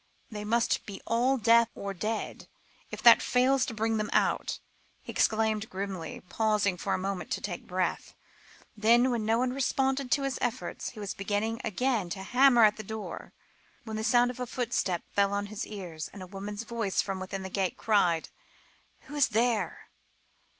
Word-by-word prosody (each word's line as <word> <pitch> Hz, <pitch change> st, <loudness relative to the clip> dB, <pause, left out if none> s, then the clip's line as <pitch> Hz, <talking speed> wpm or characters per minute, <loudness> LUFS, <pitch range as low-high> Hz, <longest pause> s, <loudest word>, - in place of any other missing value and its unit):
"They 210 Hz, -1 st, -5 dB
must 230 Hz, +3 st, +1 dB
be 200 Hz, -2 st, -7 dB
all 245 Hz, +4 st, +2 dB
deaf 230 Hz, 0 st, +5 dB
or 200 Hz, 0 st, -4 dB
dead, 215 Hz, +4 st, -4 dB, 0.4 s
if -, -, -7 dB
that -, -, +9 dB
fails 255 Hz, +1 st, +2 dB
to 235 Hz, -, -4 dB
bring 225 Hz, +1 st, 0 dB
them 215 Hz, 0 st, -2 dB
out," -, -, +1 dB, 0.5 s
he -, -, -7 dB
exclaimed 220 Hz, -1 st, +1 dB
grimly, 190 Hz, -3 st, -5 dB
pausing 210 Hz, -2 st, +1 dB
for 190 Hz, +2 st, -1 dB
a -, -, -1 dB
moment 190 Hz, 0 st, -4 dB
to -, -, -2 dB
take 180 Hz, -4 st, -6 dB
breath; 180 Hz, -1 st, -2 dB, 0.6 s
then, 235 Hz, +4 st, +4 dB
when 225 Hz, -3 st, -1 dB
no 225 Hz, +1 st, +3 dB
one 250 Hz, +1 st, 0 dB
responded 270 Hz, 0 st, 0 dB
to 280 Hz, -, +1 dB
his 275 Hz, -2 st, -2 dB
efforts, 245 Hz, +2 st, -3 dB
he 225 Hz, -, -12 dB
was 205 Hz, -2 st, -4 dB
beginning 210 Hz, +3 st, -2 dB
again 220 Hz, -3 st, 0 dB
to 190 Hz, +3 st, -5 dB
hammer 245 Hz, +2 st, +5 dB
at 210 Hz, -1 st, +5 dB
the 215 Hz, -, -6 dB
door, 220 Hz, +1 st, -7 dB, 0.5 s
when 220 Hz, -2 st, -6 dB
the 220 Hz, -, -3 dB
sound 245 Hz, +1 st, +4 dB
of 250 Hz, -, -12 dB
a 250 Hz, -, -3 dB
footstep 230 Hz, -8 st, -1 dB
fell 200 Hz, 0 st, +2 dB
on 205 Hz, 0 st, -1 dB
his 210 Hz, -, -4 dB
ears, 175 Hz, -7 st, -6 dB
and 195 Hz, -2 st, -9 dB
a -, -, -7 dB
woman's 200 Hz, +3 st, -6 dB
voice 230 Hz, -4 st, -2 dB
from 195 Hz, -1 st, -4 dB
within 190 Hz, +1 st, -5 dB
the 190 Hz, -, -5 dB
gate 190 Hz, -2 st, -1 dB
cried 180 Hz, -7 st, +2 dB, 0.7 s
"Who -, -, -13 dB
is 290 Hz, -2 st, +3 dB
there?" 225 Hz, -5 st, 0 dB
215 Hz, 185 wpm, -29 LUFS, 195-240 Hz, 0.7 s, that